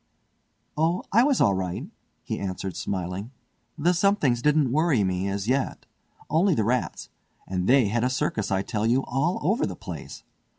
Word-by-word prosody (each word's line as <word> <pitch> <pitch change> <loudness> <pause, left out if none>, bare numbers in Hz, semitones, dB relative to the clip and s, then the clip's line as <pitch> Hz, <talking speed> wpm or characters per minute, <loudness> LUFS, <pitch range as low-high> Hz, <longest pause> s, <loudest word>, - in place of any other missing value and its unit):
"Oh, 165 +4 +1
I 230 - +5
was 280 -2 +2
all 100 - +4
right," 95 -2 -3 0.4
he - - -4
answered 95 -1 -4
smiling, 95 +3 -4 0.5
"the 170 +4 +2
'somethings' 170 - +2
didn't 150 -2 +3
worry 150 -6 +2
me, 95 0 -1
as 100 +1 -3
yet. 130 +2 -1 0.4
Only 170 +3 +3
the 110 - +1
rats; 120 +3 -1 0.4
and 90 0 -2
they 125 -5 +5
had 115 +2 0
a 125 - +2
circus, 120 -4 -1
I 95 0 0
tell 110 +1 -1
you, 125 +3 +2
all 145 +8 0
over 205 - +1
the - - -5
place. - - -8
125 Hz, 170 wpm, -25 LUFS, 100-155 Hz, 0.5 s, I